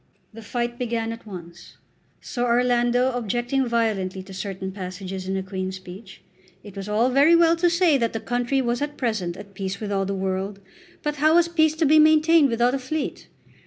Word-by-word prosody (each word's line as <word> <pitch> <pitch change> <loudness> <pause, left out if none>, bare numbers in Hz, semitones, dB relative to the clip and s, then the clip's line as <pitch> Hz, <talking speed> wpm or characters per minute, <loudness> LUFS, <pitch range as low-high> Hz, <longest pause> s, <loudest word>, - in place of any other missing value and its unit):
The 225 - -10
fight 240 +2 -3
began 230 -2 -2
at 230 -1 -12
once, 170 -3 -11 0.4
Sir 245 - -4
Orlando 245 +1 +2
objecting 245 +3 -1
violently 205 -5 -1
to 190 +1 -12
certain 190 0 -5
passages 185 0 -6
in 190 - -1
the 190 - -2
Queen's 190 0 -4
Speech. 190 +2 -12 0.4
It 205 -2 -12
was 195 +1 -6
all 225 +5 +2
very 285 +6 +5
well 335 0 +5
to 350 +1 +3
say 340 -4 +3
that 230 -1 0
the 225 - -4
country 245 +4 -1
was 240 +1 -1
at 295 0 -3
present 210 -8 -2
at 200 0 -11
peace 195 0 -4
with 210 -2 -5
all 195 -1 0
the 200 - -2
world; 190 +1 -3 0.4
but 295 0 -2
how 310 +3 +4
was 345 0 +5
peace 315 -2 +2
to 320 0 +1
be 310 +2 +6
maintained 310 -1 +5
without 240 +2 +2
a 275 - -1
fleet? 275 +3 -4
235 Hz, 200 wpm, -23 LUFS, 195-275 Hz, 0.4 s, be